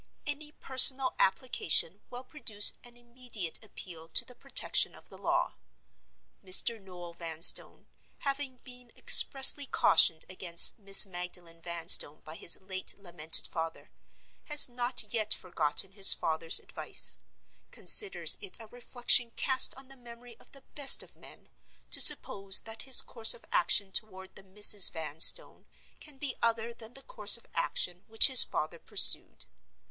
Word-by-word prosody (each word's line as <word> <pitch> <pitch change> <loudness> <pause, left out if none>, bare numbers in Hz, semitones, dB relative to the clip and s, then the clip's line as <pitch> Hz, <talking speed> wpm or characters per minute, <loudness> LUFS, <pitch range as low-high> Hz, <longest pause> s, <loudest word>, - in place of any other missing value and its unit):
Any 295 +1 -9
personal 260 0 +2
application 195 - -1
will 245 +1 -13
produce 225 -7 0
an 240 0 -20
immediate 240 -7 -9
appeal 170 -6 -13
to - - +4
the - - -16
protection - - 0
of - - -17
the - - -17
law. - - -5 0.9
Mr. 200 +4 0
Noel 175 -3 -15
Vanstone, 165 -1 0 0.3
having 275 -2 -8
been 250 -2 -18
expressly 275 +1 +4
cautioned 160 -9 +1
against 180 +1 0
Miss 195 -1 +5
Magdalen 175 -2 -11
Vanstone 165 -3 +1
by 155 - -13
his 170 - -2
late 190 0 -6
lamented 165 -4 -2
father, 165 0 -10 0.5
has 295 -1 +2
not 245 0 -4
yet 215 -2 -3
forgotten 175 +1 -4
his 195 -1 +3
father's 160 0 -2
advice. - - -2 0.5
Considers 415 -3 +1
it 400 -3 -5
a 225 - -15
reflection 245 +1 0
cast 260 -1 +3
on 265 0 -15
the 270 - -17
memory 240 -1 -18
of - - -24
the 275 -1 -18
best 285 -2 +3
of - - -16
men, - - -18 0.4
to - - +1
suppose 195 0 +3
that 225 0 -10
his 260 - +6
course 225 -2 0
of - - -20
action 190 +2 +1
toward 190 -2 -6
the - - -13
Misses 200 0 +4
Vanstone 160 - 0 0.3
can 300 -3 -15
be 275 -2 -7
other 230 0 -5
than 230 0 -17
the 270 - -14
course 210 -2 +1
of 235 - -21
action 175 +2 -3
which 225 0 +6
his 260 -3 +5
father 155 +2 -9
pursued. - - 0
215 Hz, 145 wpm, -26 LUFS, 180-250 Hz, 0.9 s, his